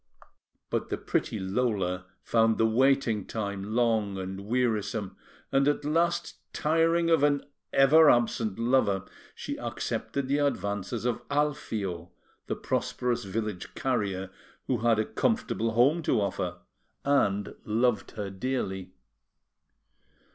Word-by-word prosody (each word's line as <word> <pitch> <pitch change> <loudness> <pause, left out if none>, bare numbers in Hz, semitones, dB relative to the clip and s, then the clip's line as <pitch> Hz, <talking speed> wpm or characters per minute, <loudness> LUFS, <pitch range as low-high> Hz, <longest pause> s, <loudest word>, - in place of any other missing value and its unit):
But - - -1
the - - -1
pretty - - -1
Lola 95 -3 -1 0.2
found 115 -1 +3
the 115 - +3
waiting 120 -2 +3
time 100 -1 -4
long 110 -5 +1
and 95 +1 -6
wearisome; 110 -4 -1 0.4
and, 135 +1 +3
at 145 0 +1
last, 170 +3 0 0.2
tiring 165 +2 +2
of 165 -3 +5
an 145 -1 +2 0.3
ever 150 +3 +7
absent 115 -4 +2
lover, 115 -5 +2 0.3
she - - -5
accepted 140 -2 -3
the 140 +2 +1
advances 110 -5 -1
of 120 -2 0
Alfio, 110 - -1 0.4
the - - -1
prosperous 125 -4 -1
village 105 -1 -4
carrier, 100 -7 -1 0.3
who 125 -3 0
had 115 0 +3
a 110 - +1
comfortable 115 0 0
home 135 +9 +4
to 150 - +1
offer 100 -2 -2 0.5
and 105 -8 +2
loved 110 0 +1
her 100 -2 -3
dearly. 95 -4 -3
115 Hz, 120 wpm, -28 LUFS, 100-135 Hz, 0.5 s, ever